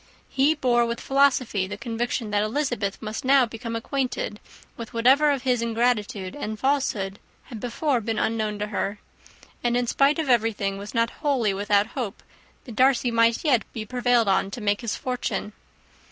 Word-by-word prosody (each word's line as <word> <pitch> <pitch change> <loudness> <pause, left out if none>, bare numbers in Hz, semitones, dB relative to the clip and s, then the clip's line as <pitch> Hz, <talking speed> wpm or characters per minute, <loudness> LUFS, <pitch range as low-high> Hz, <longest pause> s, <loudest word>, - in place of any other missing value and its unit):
He 280 +4 +3
bore 240 -4 +2
with 235 0 -3
philosophy 260 -8 +2
the 205 +1 -6
conviction 235 -1 -3
that 205 0 +2
Elizabeth 215 -3 -1
must 215 0 -4
now 265 0 +5
become 230 0 -6
acquainted 245 -3 -3 0.4
with 230 +1 -8
whatever 265 +6 +5
of 275 -3 0
his 250 -3 +1
ingratitude 225 -5 -1
and 220 -7 -4
falsehood 225 -8 0 0.2
had 230 -4 -9
before 250 +2 -1
been 225 0 -2
unknown 215 -2 -1
to 210 0 -3
her; 205 0 -2 0.7
and, 240 0 +2
in 245 - +1
spite 275 +5 +3
of 320 -3 -1
everything, 215 -5 +1
was 205 +4 -8
not 230 0 +2
wholly 255 -9 +1
without 205 +1 +2
hope 235 -7 -5 0.4
that 240 -5 -9
Darcy 255 0 +3
might 230 +4 +2
yet 255 -7 +4
be 220 -2 -5
prevailed 245 -1 +2
on 195 0 +2
to 200 - -7
make 205 0 0
his 235 -3 -2
fortune. 250 -4 -3
235 Hz, 170 wpm, -25 LUFS, 210-255 Hz, 0.7 s, now